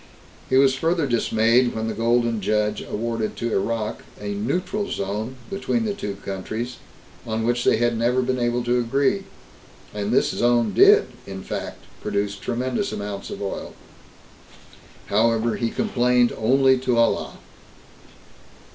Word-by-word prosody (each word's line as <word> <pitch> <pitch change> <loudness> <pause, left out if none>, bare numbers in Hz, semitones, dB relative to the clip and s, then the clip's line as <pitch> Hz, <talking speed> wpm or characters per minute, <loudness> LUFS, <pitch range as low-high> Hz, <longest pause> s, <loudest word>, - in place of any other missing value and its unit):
He 130 - +3
was 135 -1 +5
further 165 +3 +1
dismayed 120 0 +2
when 110 0 -2
the 110 - -2
Golden 115 0 +1
Judge 105 +1 0
awarded 115 0 -3
to 120 0 -3
Iraq 110 +2 -1 0.2
a 105 0 -4
"neutral 180 - -2
zone" 105 +6 -3 0.2
between 225 +4 -1
the 210 - -1
two 105 - -5
countries, 110 +6 -4 0.5
on 110 0 -1
which 120 +1 +1
they - - +4
had 120 0 +1
never 120 +3 +1
been 130 0 -1
able 120 0 0
to 120 +1 +1
agree, 140 +12 +1 0.7
and 105 0 -2
this 125 - +3
zone 120 -3 +2
did, - - +6 0.2
in 95 -1 -7
fact, - - -6 0.2
produce 100 0 -1
tremendous 125 +4 -2
amounts 100 -1 -5
of - - -6
oil. 100 - -5 1.3
However, 115 +2 +2
he 115 -2 0
complained 125 - +2
only 130 +3 +3
to 125 -2 0
Allah. 115 - +1
120 Hz, 140 wpm, -23 LUFS, 110-125 Hz, 1.3 s, did